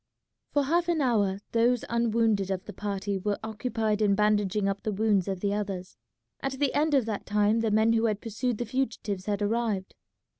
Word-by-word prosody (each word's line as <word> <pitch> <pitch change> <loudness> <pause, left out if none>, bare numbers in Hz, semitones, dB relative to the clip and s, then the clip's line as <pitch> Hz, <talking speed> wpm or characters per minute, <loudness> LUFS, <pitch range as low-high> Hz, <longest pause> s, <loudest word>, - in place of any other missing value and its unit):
For 290 - +2
half 340 +5 +1
an 335 -2 +2
hour 205 -7 +1
those 235 +1 +2
unwounded 225 -4 +1
of 190 -1 -3
the 205 - -8
party 200 0 -3
were 205 +2 -1
occupied 220 -1 -1
in 200 -2 +4
bandaging 210 -1 +2
up 195 0 -2
the 215 - -2
wounds 205 -2 +1
of 190 -2 -3
the 200 0 0
others. 195 -3 -4 0.5
At 270 -1 -2
the 270 0 0
end 300 +1 +2
of 265 -5 +3
that 215 -3 -4
time 210 +2 +2
the 225 -1 +1
men 220 +2 +3
who 225 0 +2
had 210 -2 -1
pursued 230 +2 -2
the 240 - -2
fugitives 220 -6 -3
had 205 0 0
arrived. 210 -3 -1
215 Hz, 195 wpm, -28 LUFS, 200-235 Hz, 0.5 s, in